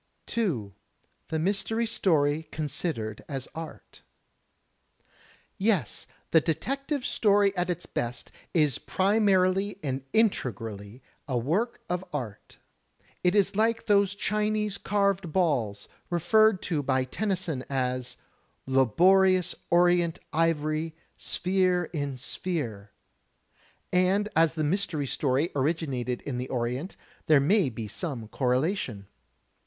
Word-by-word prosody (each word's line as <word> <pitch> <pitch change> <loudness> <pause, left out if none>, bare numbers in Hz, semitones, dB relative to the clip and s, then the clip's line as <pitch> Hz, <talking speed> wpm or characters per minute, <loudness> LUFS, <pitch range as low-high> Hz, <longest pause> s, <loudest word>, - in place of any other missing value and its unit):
2. 140 - -1 0.5
The 160 - -2
Mystery 205 +7 0
Story 160 -8 +1
Considered 145 - -3
as 135 -2 -4
Art 160 +1 -9 1.6
Yes, 195 - 0 0.2
the 160 - +6
detective 275 - -2
story 200 -2 +3
at 180 -1 -1
its 175 0 -2
best 120 0 -4 0.2
is 150 -6 +2
primarily 195 -1 +2
and 135 -2 -2
inte 220 - +2
grally 110 +1 -8 0.3
a 130 -3 0
work 175 - -1
of 180 +1 -2
art. 120 -9 -6 0.7
It 180 +2 +3
is 200 -1 +3
like 225 +2 +1
those 200 -2 +3
Chinese 210 0 0
carved 200 -4 0
balls, 125 - 0 0.2
referred 190 +4 +3
to 160 -5 0
by 130 -1 +1
Tennyson 175 -2 -2
as, 130 -2 -2 0.5
"Laborious 180 - +4 0.2
orient 175 -1 +3 0.2
ivory, 160 0 0 0.2
sphere 180 -2 0
in 145 -4 -3
sphere," 125 - -4 1.0
and 190 +3 +3
as 165 0 +4
the 155 - -1
mystery 160 -2 0
story 135 +4 0
originated 135 -4 -1
in 125 -3 -4
the 125 - -4
Orient, 125 +8 -2 0.3
there 155 -2 +6
may 175 +2 +3
be 110 -2 -6
some 120 - -5
correlation. 125 - -1
165 Hz, 110 wpm, -27 LUFS, 130-195 Hz, 1.6 s, the